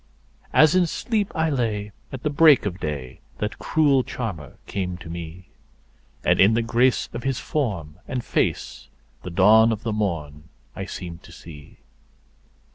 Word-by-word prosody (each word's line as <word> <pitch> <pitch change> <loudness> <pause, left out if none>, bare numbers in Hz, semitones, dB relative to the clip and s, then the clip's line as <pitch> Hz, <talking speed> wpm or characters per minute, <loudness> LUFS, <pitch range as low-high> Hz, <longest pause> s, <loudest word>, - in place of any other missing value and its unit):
As 155 +1 +6
in 180 -2 +3
sleep 210 +3 -1
I 160 0 +1
lay 105 -6 -1 0.2
at 130 -2 -7
the 150 - 0
break 150 -4 +6
of 95 -2 -3
day 70 -6 -5 0.2
that 105 0 -4
cruel 145 -5 +3
charmer 95 - -6
came 90 -3 -3
to 85 -2 -10
me, 85 +1 -8 0.7
And - - +3
in 100 +4 +6
the 115 - +1
grace 120 +2 +2
of 120 - -4
his 135 0 -1
form 90 - -3
and 125 -2 -3
face - - -2 0.3
the - - -7
dawn 110 +6 +5
of 110 0 -3
the 115 -2 -2
morn 80 -8 -3 0.3
I 95 - -5
seemed 85 -3 -7
to - - -15
see. 75 -4 -13
105 Hz, 160 wpm, -23 LUFS, 85-130 Hz, 0.7 s, As